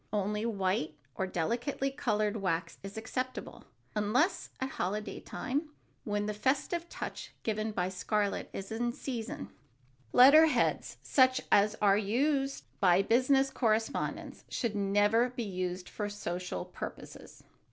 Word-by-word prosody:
Only 210 +2 0
white 190 -7 -1 0.2
or 190 - -2
delicately 240 - -1
colored 215 -6 0
wax 170 -4 -2
is 195 +2 -8
acceptable, 255 +3 -4 0.3
unless 220 - +1
at 265 - -2
holiday 210 -1 -3
time, 290 +5 -3 0.4
when 205 -1 -1
the 210 - -2
festive 285 - 0
touch - - -6
given 215 0 -1
by 180 -3 -1
scarlet 200 +2 -1
is 195 +2 -6
in 240 +2 -1
season. 230 - -5 0.6
Letter 295 +6 +8
heads, 310 - 0
such 260 -1 +4
as 205 +1 +5
are 200 0 +5
used 270 +6 0 0.2
for 185 -1 +5
business 265 +5 +3
correspondence, 225 -3 -1
should 230 -4 -2
never 205 +4 +3
be 245 -1 -4
used 185 -2 -3
for 210 -1 -4
social 180 -3 -4
purposes. - - -9
215 Hz, 130 wpm, -31 LUFS, 195-255 Hz, 0.6 s, Letter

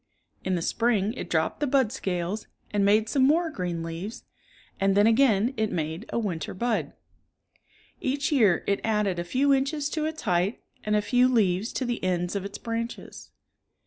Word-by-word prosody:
In 190 -1 0
the 170 - -2
spring 220 -1 +1
it 255 - -7
dropped 160 -1 0
the 295 - 0
bud 260 -5 +2
scales, 190 -3 -3 0.2
and 205 -1 +1
made 210 +2 +4
some 265 +5 +1
more 320 +5 +3
green 175 - -3
leaves, 165 +7 -6 0.6
and 195 0 +2
then 205 - +6
again 230 0 +4
it 220 -1 0
made 160 +5 -3
a - - -2
winter 185 -10 -3
bud. 235 +3 -1 1.1
Each 280 +3 -1
year 215 - +4
it 200 - +1
added 210 -5 0
a - - -1
few 270 +10 +2
Inches 285 +2 0
to 310 0 -2
its 315 0 -4
height 180 +1 0 0.2
and 210 0 +1
a 210 - +2
few 250 +3 +4
leaves 210 -4 +1
to 260 - -2
the 240 -4 -3
ends 180 0 -1
of 200 - -2
its 200 0 -6
branches. 230 +1 -5
215 Hz, 180 wpm, -26 LUFS, 185-255 Hz, 1.1 s, then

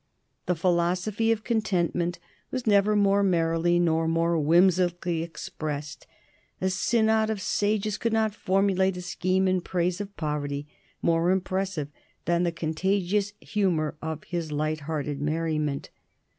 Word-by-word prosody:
The 180 - +2
philosophy 180 +6 +1
of 220 -1 0
contentment 180 -6 0 0.3
was 255 -2 -4
never 210 0 +4
more 200 -1 +4
merrily 170 -2 +2
nor 165 -2 +2
more 165 +1 +1
whimsically 175 +1 +3
expressed. 150 -3 -6 0.5
A 190 0 0
synod 220 +2 +2
of 220 -2 -2
sages 210 +1 0
could 230 - 0
not 220 -1 +1
formulate 190 -1 +1
a - - -5
scheme 185 +1 0
in 185 -1 +2
praise 180 +1 -1
of 200 0 -8
poverty 145 -2 -3 0.4
more 165 +1 +2
impressive 185 -4 -1 0.4
than 170 0 +2
the 175 -1 +1
contagious 190 +5 0
humor 175 -8 0
of 160 -1 -4
his 170 -3 -4
light 155 +1 -1
hearted 145 -2 -2
merriment. 155 -2 -1
175 Hz, 130 wpm, -26 LUFS, 165-200 Hz, 0.5 s, never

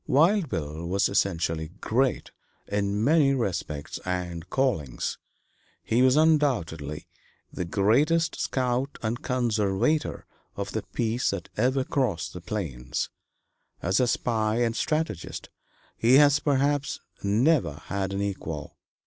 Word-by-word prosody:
Wild 165 +4 +4
Bill 80 -3 -4
was 95 +2 +2
essentially 80 -5 0
great 130 +3 0 0.4
in 100 +1 0
many 140 -1 +4
respects 90 - -3
and 90 -1 -4
callings. 95 - -1 0.6
He 115 +3 +2
was 130 +1 +5
undoubtedly 120 - +1 0.5
the 90 - -3
greatest 135 - +2
scout 130 +1 -1
and 115 +2 -2
conservator 120 +3 0 0.3
of - - -3
the - - -2
peace 115 +1 -1
that 100 -4 -4
ever 130 +4 +2
crossed 125 - -1
the - - -7
plains; 70 - -3 0.7
as 95 +3 +2
a 125 - +3
spy 115 -1 +1
and 115 -1 0
strategist 155 - -2 0.5
he 120 +3 +5
has, 145 0 +6
perhaps, 145 0 +1 0.2
never 115 - +2
had 95 -1 -2
an 100 +1 -1
equal. 80 -7 -5
110 Hz, 120 wpm, -26 LUFS, 90-135 Hz, 0.7 s, has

